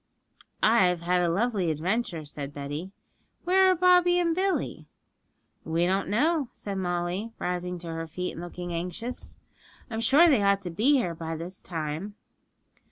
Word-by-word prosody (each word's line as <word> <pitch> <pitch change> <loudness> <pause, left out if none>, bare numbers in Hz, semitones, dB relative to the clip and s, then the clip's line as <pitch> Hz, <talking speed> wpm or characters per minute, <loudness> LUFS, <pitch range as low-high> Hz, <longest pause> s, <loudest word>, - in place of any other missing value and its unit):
'I've 185 -6 +4
had 180 +1 +2
a 175 - +2
lovely 200 -1 0
adventure,' 170 +1 -1
said 145 -1 -6
Betty. 145 +6 -5 0.5
'Where 375 +1 +5
are 370 - +4
Bobby 360 0 +5
and 335 -2 +2
Billy?' 380 +1 -1 0.8
'We 165 +2 0
don't 190 +2 0
know,' 285 +5 +1
said 200 -2 -5
Molly, 175 +4 -2
rising 180 0 -3
to 170 -1 -7
her 165 0 -4
feet 180 +3 -4
and 165 - -8
looking 175 0 -6
anxious. 180 +9 -5 0.5
'I'm 225 0 -2
sure 280 +9 +6
they 270 -10 +4
ought 200 0 +2
to 175 - -4
be 225 - +3
here 240 -11 +1
by 165 0 -5
this 175 +4 -7
time.' 165 +4 -4
180 Hz, 160 wpm, -27 LUFS, 170-235 Hz, 0.8 s, sure